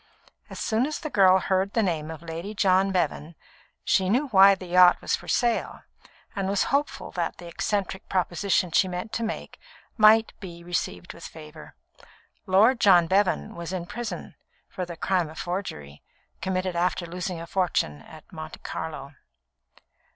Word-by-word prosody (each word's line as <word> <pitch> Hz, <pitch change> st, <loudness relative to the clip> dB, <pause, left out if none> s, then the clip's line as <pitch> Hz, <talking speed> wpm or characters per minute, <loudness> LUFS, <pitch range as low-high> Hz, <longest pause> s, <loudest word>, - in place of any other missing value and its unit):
As -, -, -8 dB
soon 230 Hz, +4 st, 0 dB
as 305 Hz, -, -4 dB
the 310 Hz, -, -6 dB
girl 190 Hz, -2 st, +6 dB
heard 190 Hz, +1 st, 0 dB
the 225 Hz, -, +2 dB
name 160 Hz, -5 st, -2 dB
of 160 Hz, 0 st, -8 dB
Lady 170 Hz, +6 st, -6 dB
John 195 Hz, -1 st, +3 dB
Bevan, 165 Hz, -2 st, -2 dB, 0.5 s
she 185 Hz, -1 st, +2 dB
knew 265 Hz, +7 st, +1 dB
why 195 Hz, -2 st, +7 dB
the 185 Hz, -, -10 dB
yacht 180 Hz, 0 st, +6 dB
was -, -, 0 dB
for -, -, -12 dB
sale, 240 Hz, -2 st, 0 dB, 0.5 s
and 195 Hz, -1 st, -2 dB
was 200 Hz, 0 st, +2 dB
hopeful 285 Hz, +1 st, -1 dB
that 170 Hz, -2 st, -3 dB
the 175 Hz, -, -11 dB
eccentric 190 Hz, +2 st, -3 dB
proposition 185 Hz, 0 st, 0 dB
she 190 Hz, -, +3 dB
meant 180 Hz, +4 st, -5 dB
to -, -, -2 dB
make 220 Hz, -, -5 dB, 0.4 s
might 220 Hz, +1 st, +5 dB
be 170 Hz, -3 st, -10 dB
received 175 Hz, 0 st, -4 dB
with 170 Hz, -, -10 dB
favour. 155 Hz, -1 st, -12 dB, 0.7 s
Lord 215 Hz, +7 st, +4 dB
John 180 Hz, -5 st, +6 dB
Bevan 185 Hz, -, +1 dB
was 170 Hz, 0 st, -6 dB
in 180 Hz, -2 st, -4 dB
prison, 240 Hz, +5 st, -6 dB, 0.3 s
for 180 Hz, -2 st, -5 dB
the 170 Hz, -1 st, -8 dB
crime 180 Hz, -2 st, 0 dB
of 160 Hz, -, -12 dB
forgery, 75 Hz, -, -5 dB, 0.4 s
committed 185 Hz, -1 st, -2 dB
after 175 Hz, +1 st, 0 dB
losing 180 Hz, 0 st, -5 dB
a 165 Hz, -, -7 dB
fortune 170 Hz, -, -1 dB
at 155 Hz, -, -14 dB
Monte 155 Hz, 0 st, -8 dB
Carlo. 145 Hz, -3 st, -6 dB
185 Hz, 165 wpm, -25 LUFS, 170-200 Hz, 0.7 s, why